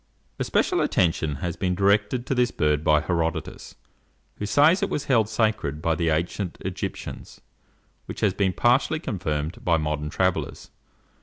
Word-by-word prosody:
Especial - - +1
attention 80 -4 +1
has 85 - -2
been 90 -2 -1
directed 100 +5 +2
to - - -1
this 125 -1 +2
bird 75 -5 0
by 75 -2 +4
Herodotus, 80 -1 -3 0.6
who 105 - -4
says 150 - +4
it 200 - 0
was 145 - -3
held 115 -5 +2
sacred 110 -10 0
by 80 +1 0
the 80 +1 0
ancient 85 +3 -2
Egyptians, - - -6 0.7
which - - -7
has 100 -3 +2
been 95 -1 +1
partially 125 - +2
confirmed 85 - -3
by 85 -3 +3
modern 75 -1 -2
travellers. 95 +2 -2
90 Hz, 150 wpm, -24 LUFS, 80-110 Hz, 0.7 s, by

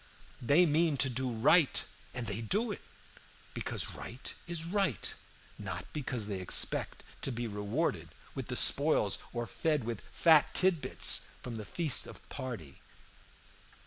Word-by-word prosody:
They 145 +9 +5
mean 160 -1 +2
to 135 0 +2
do 130 +1 -2
right, 130 +7 +3 0.3
and 125 -2 -5
they 110 0 -4
do 210 - 0
it, - - -6 0.7
because - - -3
right 125 +3 -7
is 170 -1 -3
right, 190 - -1 0.5
not - - -5
because 125 -7 -3
they 100 -2 -4
expect 90 - +1 0.2
to 135 - 0
be 120 0 -4
rewarded 105 - -2 0.2
with - - -6
the - - -4
spoils - - +4
or 120 0 -3
fed 150 +1 -1
with 115 -2 -4
fat 160 -3 +4
tit 185 -4 +2
bits - - +4 0.2
from 120 -2 -6
the 105 - -7
feast 155 - +2
of - - -12
party. 115 - -7
130 Hz, 145 wpm, -32 LUFS, 115-165 Hz, 0.7 s, They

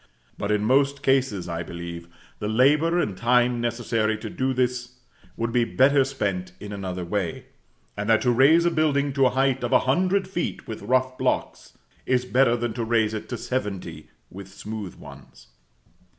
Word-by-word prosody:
But, 100 - -3
in 105 0 +1
most 140 +3 +2
cases, 130 -9 +1
I 85 -1 -3
believe, 85 0 -7 0.3
the 105 - -3
labor 150 +9 +3
and 105 - -1
time 120 +2 +2
necessary 115 -2 -1
to 110 0 -7
do 130 0 -1
this 125 -1 -1 0.4
would 115 +1 -2
be 120 0 +2
better 135 +3 +3
spent 100 -9 -3
in 105 0 -8
another 95 -3 -5
way; 90 -2 -3 0.5
and 100 +2 -4
that 110 -1 +4
to 125 - +3
raise 145 +8 +5
a 175 - +3
building 145 -3 +1
to 135 -1 +4
a - - +2
height 130 0 +1
of 120 - -2
a - - +5
hundred 185 +8 +1
feet 175 -2 -4
with 110 - -6
rough 130 +4 0
blocks, - - -2 0.3
is 125 -1 +1
better 125 -1 +3
than 120 -1 -2
to 115 - -3
raise 110 -1 +1
it 110 - -6
to 120 - -3
seventy 115 -6 -4 0.2
with 95 0 -9
smooth 105 0 -7
ones. - - -14
120 Hz, 180 wpm, -24 LUFS, 105-135 Hz, 0.5 s, raise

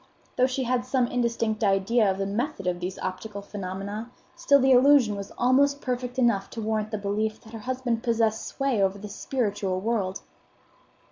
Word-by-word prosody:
Though 255 - +4
she 260 0 -2
had 250 0 0
some 255 0 +1
indistinct 230 -3 -1
idea 200 +2 +3
of 190 - -1
the 195 - -1
method 215 +2 -3
of 180 -1 -1
these 180 +1 -4
optical 200 +2 -5
phenomena, 200 +3 -5 0.3
still 280 0 +4
the 265 0 +4
illusion 255 -4 +6
was 200 0 -7
almost 280 +3 +3
perfect 250 -1 -3
enough 230 -6 +2
to - - -7
warrant 215 0 -1
the 215 - -3
belief 210 +2 -2
that 220 - -15
her 225 - -6
husband 250 -3 -1
possessed 225 -2 0
sway 270 -6 0
over 195 0 +1
the 205 +1 -8
spiritual 200 -4 -2
world. 195 -3 -1
220 Hz, 180 wpm, -26 LUFS, 200-250 Hz, 0.3 s, illusion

